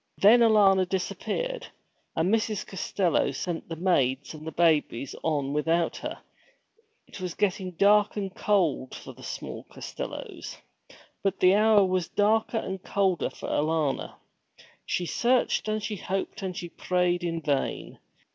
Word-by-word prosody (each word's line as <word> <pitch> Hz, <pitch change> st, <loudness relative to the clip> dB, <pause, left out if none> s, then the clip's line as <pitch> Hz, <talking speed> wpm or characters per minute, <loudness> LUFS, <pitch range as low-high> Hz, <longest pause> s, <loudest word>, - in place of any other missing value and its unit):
Then 220 Hz, +5 st, +7 dB
Alanna 200 Hz, -5 st, +5 dB
disappeared, -, -, -3 dB, 0.5 s
and 175 Hz, +6 st, +1 dB
Mrs. 215 Hz, -2 st, 0 dB
Costello 190 Hz, -2 st, 0 dB
sent 170 Hz, -2 st, -4 dB
the 165 Hz, -, -4 dB
maids 140 Hz, -6 st, +1 dB
and 155 Hz, +1 st, -8 dB
babies 150 Hz, -6 st, +2 dB
on 145 Hz, -3 st, 0 dB
without 165 Hz, +3 st, +1 dB
her. -, -, -5 dB, 0.9 s
It -, -, -11 dB
was 180 Hz, -2 st, -4 dB
getting 190 Hz, -2 st, -1 dB
dark 205 Hz, +4 st, +4 dB
and 195 Hz, -2 st, -3 dB
cold 175 Hz, -10 st, +1 dB
for -, -, -9 dB
the -, -, -16 dB
small -, -, -6 dB
Costellos. -, -, -7 dB, 0.6 s
But 195 Hz, -1 st, -1 dB
the 185 Hz, 0 st, +6 dB
hour 210 Hz, -1 st, +5 dB
was 185 Hz, -2 st, 0 dB
darker 220 Hz, +2 st, +1 dB
and 190 Hz, -3 st, -4 dB
colder 190 Hz, -3 st, 0 dB
for -, -, -9 dB
Alanna. 155 Hz, -2 st, 0 dB, 0.7 s
She 180 Hz, -, -1 dB
searched 240 Hz, +5 st, +1 dB
and 215 Hz, 0 st, -1 dB
she 210 Hz, -1 st, -3 dB
hoped 190 Hz, +2 st, -3 dB
and 185 Hz, -2 st, -4 dB
she 175 Hz, -, -5 dB
prayed 180 Hz, 0 st, 0 dB
in 165 Hz, -1 st, -1 dB
vain. 145 Hz, -4 st, -2 dB
185 Hz, 140 wpm, -27 LUFS, 165-205 Hz, 0.9 s, Then